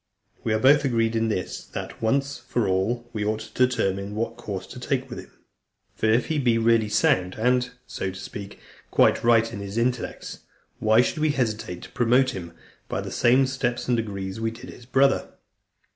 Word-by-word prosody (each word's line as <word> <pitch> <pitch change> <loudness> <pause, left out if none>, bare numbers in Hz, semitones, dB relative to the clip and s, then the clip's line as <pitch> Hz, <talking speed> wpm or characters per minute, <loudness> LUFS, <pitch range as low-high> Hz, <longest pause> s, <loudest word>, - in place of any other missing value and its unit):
We 115 - -1
are - - +3
both 140 +4 +5
agreed 115 -4 +1
in 115 0 +1
this, 100 -4 -3
that, - - -6
once 140 +6 0
for 120 -4 -1
all, 105 +6 0
we 105 -2 -2
ought 110 +1 0
to 110 +3 +1
determine 100 -4 -2
what 115 +1 -2
course 105 -5 -6
to - - -10
take - - -1
with - - -5
him. - - -11 0.7
For 110 - 0
if 115 +3 +3
he 155 -2 -1
be 120 -4 +3
really 115 -1 +3
sound 90 -3 +2
and, 125 +2 +2 0.2
so 95 - -4
to 95 0 -8
speak, 100 0 -8 0.3
quite - - +3
right 115 -1 +4
in 100 - -5
his 100 +2 -6
intellects, 120 +1 -2 0.4
why 110 +2 +5
should 140 - -1
we 155 0 +2
hesitate 110 -9 -2
to - - -11
promote 125 +2 +3
him 85 -5 -7 0.4
by - - -2
the - - -6
same 130 +3 +4
steps 125 -2 -2
and 125 - +3
degrees 100 -3 -4
we 115 0 0
did 115 +1 -10
his 120 - -14
brother? 135 +1 +3
115 Hz, 195 wpm, -25 LUFS, 105-125 Hz, 0.7 s, both